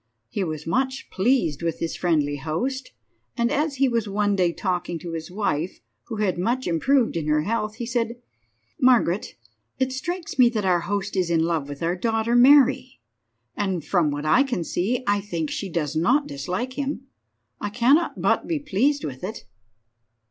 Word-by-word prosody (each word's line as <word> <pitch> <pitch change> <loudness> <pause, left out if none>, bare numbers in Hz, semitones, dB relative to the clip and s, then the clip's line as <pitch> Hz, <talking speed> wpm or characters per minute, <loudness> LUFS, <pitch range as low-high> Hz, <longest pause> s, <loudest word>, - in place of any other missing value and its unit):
He 195 - -2
was 155 -3 -4
much 260 +10 -1
pleased 190 - +1
with 165 -1 -1
his 165 - -3
friendly 150 -5 +1
host, 245 - -3 0.5
and 235 +1 +1
as 295 0 0
he 275 +1 +3
was 230 -4 -1
one 205 0 +1
day 180 -3 +2
talking 180 -1 -2
to 170 +1 -7
his 165 -1 -5
wife, 180 -4 -2 0.3
who 230 - -6
had 205 -4 0
much 240 +8 0
improved 230 - +2
in 160 -2 -2
her 150 0 +2
health, 215 +2 -2
he 235 - -5
said— 235 -1 -1 0.6
"Margaret, 235 -7 +3 0.4
it 260 0 0
strikes 335 +3 -4
me 245 -2 +7
that 215 -4 -2
our 180 -2 +3
host 200 +4 -3
is 185 -3 +1
in 165 -1 +2
love 165 -4 -1
with 145 +2 -6
our 170 +2 +1
daughter 225 +4 0
Mary, 265 0 +5 0.6
and, 190 -5 -2
from 175 -5 +2
what 145 +1 -3
I 155 +12 +5
can 245 -10 -1
see, 225 +10 -1
I 205 -1 +2
think 170 -6 -3
she 195 - -3
does 155 -3 -2
not 255 - +3
dislike 180 - -4
him. 280 -1 -3 0.5
I 205 - -3
cannot 255 +10 +2
but - - +1
be 330 - 0
pleased 285 +1 0
with 130 0 -7
it." 215 +4 -6
205 Hz, 180 wpm, -24 LUFS, 170-255 Hz, 0.6 s, me